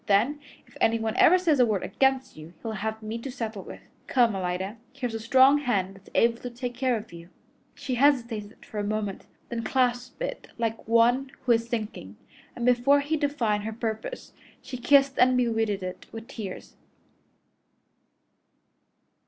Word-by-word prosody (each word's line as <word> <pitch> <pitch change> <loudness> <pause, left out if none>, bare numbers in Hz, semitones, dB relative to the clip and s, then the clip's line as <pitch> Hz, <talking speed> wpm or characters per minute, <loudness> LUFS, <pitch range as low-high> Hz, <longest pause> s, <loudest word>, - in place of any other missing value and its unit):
Then, 230 +9 +3 0.3
if - - -22
anyone 225 0 +1
ever 365 - +7
says 330 -6 +2
a 250 - +7
word 210 -3 0
against 265 -1 +1
you, 155 +2 -11
he'll 225 - -3
have 220 +1 -4
me 220 +2 -4
to 270 - -6
settle 225 -5 -5
with. - - -10 0.3
Come, 240 -4 +3
Alida! 190 +3 -3 0.2
Here's 250 -4 -4
a 225 - -3
strong 265 +5 +5
hand 200 -9 0
that's 195 0 -17
able 230 0 +3
to 250 - -5
take 245 0 -5
care 250 -1 +1
of 215 -3 -10
you." 170 0 -11 0.5
She 260 - -4
hesitated 235 -6 +1 0.2
a 210 - -1
moment, 205 -1 -3 0.2
then 235 -1 -3
clasped 250 - 0
it - - -5
like 225 -2 -3
one 240 +4 +3
who 250 - +2
is 230 0 +2
sinking, 215 - -5 0.4
and 240 - -3
before 250 +3 +4
he 295 +3 -1
divined 250 -9 0
her 220 +1 -4
purpose, 225 - -5 0.3
she - - -8
kissed 275 +2 +4
and 255 0 +5
bedewed 225 -3 +1
it 185 0 -7
with 225 0 -8
tears. 200 -5 -8
235 Hz, 165 wpm, -27 LUFS, 215-255 Hz, 0.5 s, ever